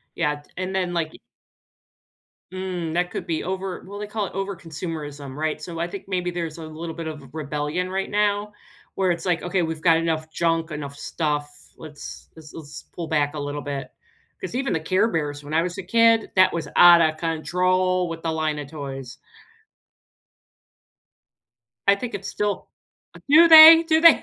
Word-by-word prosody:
Yeah 150 -3 0
d - - -27
and 185 +1 -4
then, 180 -2 -1
like 165 -2 -2 1.4
Mm, 180 -3 -4
that 175 +1 0
could - - -5
be 160 - -2
over 190 0 -4
well, 200 +1 -8
they 210 - -5
call 210 -1 -2
it - - -10
overconsumerism, 160 -7 -6
right? 155 0 -2
So 165 0 -7
I 170 - -1
think 190 +3 -8
maybe 180 -2 -1
there's 170 -2 -5
a 160 - -7
little 160 +1 -7
bit 165 -1 -6
of 145 -5 -8
rebellion 150 +4 -3
right 190 +1 -3
now 210 0 0 0.4
where 190 -2 +2
it's 170 - -6
like, 175 -2 0
"Okay, 180 +1 0
we've 160 -1 -3
got 165 0 +4
enough 160 -1 -2
junk, 165 0 0
enough 140 -2 -6
stuff. 145 -1 -2 0.3
Let's 150 -2 -10
let's 155 -2 -14
let's 150 -2 -10
pull 170 -2 -6
back 150 -1 0
a 150 - -4
little 145 0 -4
bit." 140 -1 -5 0.5
'Cause - - -6
even 270 +1 -1
the 160 - 0
Care 185 +7 +1
Bears, 145 -6 -3
when 150 +2 -6
I 165 - +3
was 175 0 -5
a - - -3
kid, 230 +2 +3
that 185 0 +5
was 165 -3 -3
outta 170 -2 +7
control 180 +3 0
with 165 0 -7
the 165 -1 -1
line 155 -1 -1
of 145 -2 -7
toys. 135 -5 -8 2.7
I 200 - +6
think 235 +4 -6
it's 195 0 -5
still 210 -1 -3 0.6
do 325 +4 +7
the 325 +1 +11
do 315 -1 +4
they? 335 0 +7
165 Hz, 180 wpm, -23 LUFS, 155-190 Hz, 2.7 s, the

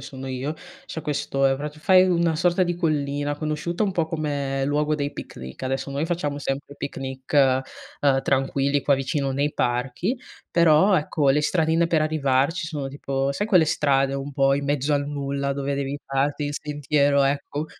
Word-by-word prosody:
sono 135 0 -8
io, 130 +3 -3 0.3
c'è 160 - -5
questo, 140 -2 0
ehm, 135 0 +2
prati 150 +1 -6
fai 185 +3 +5
una 170 -2 +2
sorta 175 +3 +2
di 175 0 -1
collina 145 -3 -1
conosciuta 155 +5 -2
un 195 - -1
po' 165 -3 0
come 145 -4 -2
luogo 150 +2 +1
dei 145 0 -2
picnic. 65 - -9
Adesso 135 +1 -2
noi 140 +3 -1
facciamo 165 -4 -2
sempre 140 +1 -4
picnic, 135 -2 -6
ehm, 135 0 +1
tranquilli 135 +1 +1
qua 140 0 +3
vicino 135 0 -1
nei 145 +2 0
parchi, 130 - -1 0.3
però 170 +3 +5
ecco 150 -2 +1
le 150 - +3
stradine 160 +1 +2
per 160 -2 +2
arrivarci 155 +2 +1
sono 150 -5 -4
tipo 135 0 -2
sai 175 +9 -2
quelle 185 -7 +5
strade 135 -2 +2
un 140 +1 -5
po' 135 0 +3
in 140 0 -2
mezzo 145 +1 0
al 145 0 0
nulla 140 -1 -2
dove 140 0 -2
devi 140 0 -2
farti 140 +2 -1
il 145 - -4
sentiero, 145 -1 +1
ecco 145 +2 -1
145 Hz, 175 wpm, -24 LUFS, 135-155 Hz, 0.3 s, fai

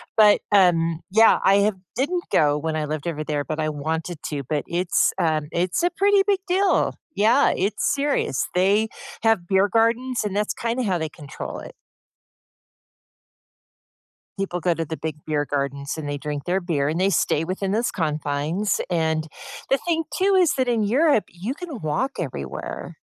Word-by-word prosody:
But, 210 -2 +6
um, 170 -4 +3
yeah, 220 +3 +6
I 195 - +5
have 205 0 +2 0.2
didn't 345 +8 -1
go 145 -1 +3
when 160 +1 -2
I 155 - -1
lived 155 +1 -4
over 155 -2 -3
there, 145 -1 -1
but 155 +2 -4
I 155 - 0
wanted 160 +3 -3
to, 145 -2 -3
but 150 0 -1
it's, 175 +1 +1
um, 155 -3 +1
it's 180 - 0
a 350 - +4
pretty 400 0 +4
big 395 -2 +3
deal. 380 +2 +2 0.2
Yeah, 230 +7 +4
it's 200 +3 0
serious. 280 - 0
They 200 +4 +3 0.4
have 225 -6 +3
beer 195 +1 +3
gardens, 230 +2 +1
and 205 - -3
that's 210 0 0
kinda 235 +2 -2
how 190 -5 0
they 160 -2 -3
control 145 -2 -8
it. - - -10 2.6
People 190 -2 -2
go 175 0 +1
to 165 - -3
the 160 0 -5
big 160 -2 -4
beer 150 -2 0
gardens, 140 0 -2
and 145 -2 -5
they 145 - -2
drink 145 0 -5
their 180 +2 0
beer, 150 -6 -1
and 160 +3 -2
they 190 +1 +3
stay 165 -4 +1
within 190 +2 -2
those 225 +4 +1
confines. 155 +4 -1
And 160 -2 0 0.4
the 270 - +4
thing, 325 +1 -1
too, 390 +1 +3
is 360 -5 +4
that 260 -1 0
in 235 -3 +1
Europe, 265 +3 +3
you 190 +9 -5
can 325 - -7
walk 155 - -1
everywhere, 70 - -6
180 Hz, 175 wpm, -23 LUFS, 155-230 Hz, 2.6 s, But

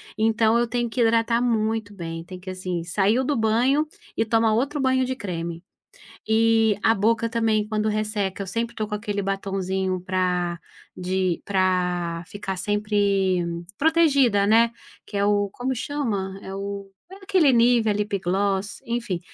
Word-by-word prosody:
Então, 225 +1 +3
eu 240 - +1
tenho 240 +1 -1
que 240 +2 -2
hidratar 230 +1 +3
muito 220 -3 0
bem, 165 -4 -6
tem 185 +2 -10
que 185 +1 -7
assim. 185 -2 -4
Saiu 200 +8 +1
do 285 +2 0
banho, 245 +7 +2 0.3
e - - +2
toma 225 0 +2
outro 275 +6 0
banho 260 -1 +2
de 260 0 -2
creme. 170 -6 -5 0.7
Eh, 225 -1 +4
a 225 - +4
boca 230 +3 +1
também 220 -2 +1
quando 215 0 -1
resseca, 210 -2 -2
eu - - -6
sempre 230 +4 -3
tô 215 -2 -3
com 210 - -5
aquele 205 -1 -3
"batonzinho" 190 -1 -2
pra 180 -2 -1 0.3
de 185 -1 -1
pra, 180 -3 0
ficar 200 -1 -5
sempre, 200 -2 +1 0.4
protegida, 280 -10 +3
né. 230 +2 +5 0.4
Que 205 - -7
é 200 - +2
o. 205 0 +2
Como 255 +4 -3
chama? 220 -8 -3
É 190 - -7
o 200 0 -5 0.2
é 385 - -10
aquele 380 -7 +3
Nívea, 235 -2 +4
Lip 205 -1 -1
Gloss, 195 +2 -1
enfim 235 -7 -2
210 Hz, 160 wpm, -24 LUFS, 190-230 Hz, 0.7 s, né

